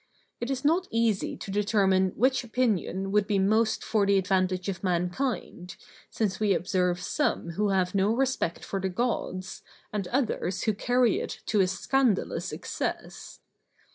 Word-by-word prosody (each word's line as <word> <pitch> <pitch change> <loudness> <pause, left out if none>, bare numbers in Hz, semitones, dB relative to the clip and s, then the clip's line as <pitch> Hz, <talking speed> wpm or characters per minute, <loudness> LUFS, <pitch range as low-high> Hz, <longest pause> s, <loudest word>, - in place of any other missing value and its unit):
It 240 - -3
is 270 0 -3
not 345 +5 +3
easy 225 -3 0
to 195 - -7
determine 195 -2 +2
which 260 +3 +2
opinion 210 -5 -1
would 210 0 +2
be 205 - +1
most 215 +3 +2
for 215 -2 +1
the 200 0 +4
advantage 185 -1 0
of 195 -1 -4
mankind, 180 0 -2 0.3
since 200 -4 -1
we 205 -3 +3
observe 180 0 0
some 185 - -1
who 205 +4 0
have 185 -2 +1
no 195 0 +2
respect 255 -8 -1
for 195 - -3
the 190 - -1
Gods, 185 -3 -3 0.3
and 200 -3 -2
others 220 -7 -1
who 215 - +2
carry 245 +3 +2
it - - -6
to 215 - +1
a 185 - +3
scandalous 215 +4 0
excess. - - -5
200 Hz, 155 wpm, -27 LUFS, 185-230 Hz, 0.3 s, the